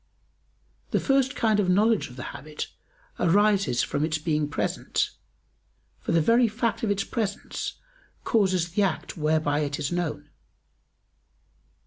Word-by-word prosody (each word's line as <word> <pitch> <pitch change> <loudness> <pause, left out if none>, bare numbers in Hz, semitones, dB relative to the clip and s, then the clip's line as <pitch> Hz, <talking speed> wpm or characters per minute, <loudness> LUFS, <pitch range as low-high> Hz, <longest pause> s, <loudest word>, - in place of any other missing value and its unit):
The - - +1
first 270 -1 +2
kind 220 -2 +2
of 190 -3 +2
knowledge 210 -1 +3
of 125 - -12
the 130 - -6
habit 150 +1 -6 0.5
arises 200 - +3
from 145 - -1
its 160 0 0
being 155 -1 0
present, 145 - -1 0.9
for - - -3
the 165 - +4
very 235 +8 +4
fact 225 0 -1
of 225 - 0
its 200 -1 +1
presence 210 -3 -3 0.5
causes 190 -6 +2
the 205 - +1
act 190 -5 -1
whereby 155 -2 +1
it 145 -1 -1
is 150 0 -2
known. 150 -4 -3
180 Hz, 135 wpm, -26 LUFS, 150-215 Hz, 0.9 s, the